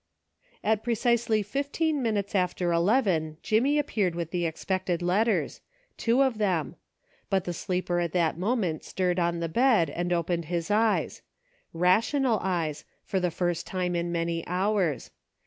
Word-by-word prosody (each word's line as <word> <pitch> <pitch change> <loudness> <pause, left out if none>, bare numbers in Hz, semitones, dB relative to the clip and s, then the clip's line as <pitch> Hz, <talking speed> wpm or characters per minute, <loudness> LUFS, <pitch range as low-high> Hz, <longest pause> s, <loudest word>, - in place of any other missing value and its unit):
At 215 0 +2
precisely 235 -2 +1
fifteen 285 - -1
minutes 210 -4 -1
after 180 -2 0
eleven, 170 -4 +1
Jimmy 255 +7 +2
appeared 210 - 0
with 170 -1 -4
the 175 -2 0
expected 180 +1 -2
letters 210 +6 +1 0.2
— - - -40
two 240 +4 +4
of 255 -5 0
them; 180 -8 0 0.5
but 190 -2 +1
the 175 - -3
sleeper 180 -1 -1
at 170 -2 -1
that 170 -3 +1
moment 185 -3 -1
stirred 180 -1 -1
on 170 -1 0
the 165 - -1
bed, 215 - +3
and 175 +3 -3
opened 170 -1 0
his 170 +3 -2
eyes: 220 +1 +1 0.5
rational 220 - +2
eyes, 165 -5 -2 0.2
for 190 - -1
the 180 -1 +1
first 175 0 -2
time 180 -1 -2
in 170 0 -1
many 170 -1 -1
hours. 185 -3 0
185 Hz, 150 wpm, -27 LUFS, 170-220 Hz, 0.5 s, two